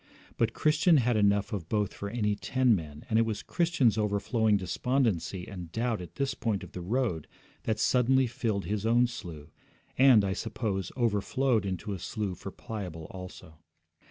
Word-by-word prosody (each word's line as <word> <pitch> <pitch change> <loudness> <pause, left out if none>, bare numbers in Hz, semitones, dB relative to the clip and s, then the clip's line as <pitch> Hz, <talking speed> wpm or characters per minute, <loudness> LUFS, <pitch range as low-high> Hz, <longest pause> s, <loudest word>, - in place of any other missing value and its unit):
But 115 -1 0
Christian 155 +2 +4
had 125 -2 +2
enough 100 +1 +2
of 90 -5 -4
both 105 -3 0
for 100 - -5
any 105 -2 0
ten 130 +3 +2
men, 75 -2 -7
and 110 -2 +2
it - - +6
was 110 -2 -2
Christian's 145 - +2
overflowing 105 +1 +2
despondency 100 -3 -1
and 90 -4 -8
doubt 115 -1 -1
at 90 - -10
this 140 -1 -1
point 110 -5 -2
of - - -10
the 90 - -6
road 100 - -1 0.4
that 110 -1 0
suddenly 130 +3 +3
filled 110 -4 -2
his 105 0 -2
own 120 +2 +4
slough, 85 -10 -8 0.5
and, 130 -6 +7
I 95 - 0
suppose, 105 -2 -3
overflowed 115 0 +1
into 95 +2 -3
a 95 - -5
slough 100 -3 -4
for - - -6
Pliable 90 -8 -7
also. 90 -4 -10
105 Hz, 170 wpm, -29 LUFS, 95-120 Hz, 0.5 s, and